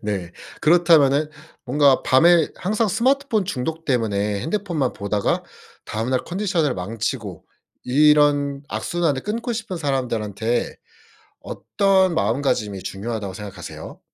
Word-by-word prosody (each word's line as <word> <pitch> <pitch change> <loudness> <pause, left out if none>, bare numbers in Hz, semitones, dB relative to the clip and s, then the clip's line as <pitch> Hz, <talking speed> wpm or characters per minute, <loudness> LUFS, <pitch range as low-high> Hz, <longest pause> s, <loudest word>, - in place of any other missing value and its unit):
네. 95 -5 -4 0.3
그렇다면은 155 -3 +4 0.3
뭔가 140 0 +3
밤에 165 +5 +5
항상 215 +3 0
스마트폰 240 0 +1
중독 160 0 -4
때문에 105 -5 0
핸드폰만 165 - -2
보다가 100 0 -1 0.4
다음날 120 +4 -2
컨디션을 175 -6 -1
망치고 105 - -4 0.4
이런 145 0 +3
악순환을 165 -6 -1
끊고 230 +3 -3
싶은 215 -5 -5
사람들한테 120 - -2 0.7
어떤 190 -3 +1
마음가짐이 105 -4 -1
중요하다고 100 -1 -5
생각하세요? 105 0 -9
140 Hz, 295 characters per minute, -22 LUFS, 110-175 Hz, 0.7 s, 밤에